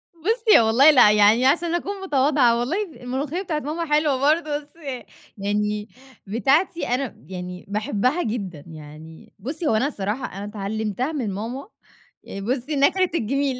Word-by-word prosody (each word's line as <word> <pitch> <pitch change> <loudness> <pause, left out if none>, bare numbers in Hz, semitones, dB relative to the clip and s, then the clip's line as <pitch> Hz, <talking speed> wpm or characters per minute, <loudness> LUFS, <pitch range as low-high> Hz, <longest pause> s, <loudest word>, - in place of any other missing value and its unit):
بُصّي، 440 - +4
هو 225 - +3
والله 265 +7 +6
لأ، 245 -7 +7
يعني 210 +4 +5
عشان 340 +4 +2
أكون 390 +2 -4
متواضعة 270 -7 +2
والله 275 +11 -1
الملوخية 290 +1 -4
بتاعة 325 -6 -2
ماما 315 +4 -4
حلوة 300 -3 +2
برضه، 300 +1 +1
بس 295 +2 -19
ي 275 -7 -7 0.3
يعني 210 +1 -2 0.4
بتاعتي 285 - +1
أنا 250 +1 -2
يعني 180 -1 -7
باحبها 215 - 0
جدًا. 195 -10 -4
يعني 155 0 -12
بُصّي، 295 - -4
هو 220 - +2
أنا 260 +6 +2
الصراحة 215 0 -3
أنا 200 - -5
اتعلِّمتها 215 - -3
من 240 -10 -3
ماما 240 - -5 0.6
آآ 195 - -7
بُصّي، 255 +7 -2
ناكرة 360 +7 +3
الجِميل. 270 +1 -1
255 Hz, 155 wpm, -23 LUFS, 210-305 Hz, 0.6 s, لأ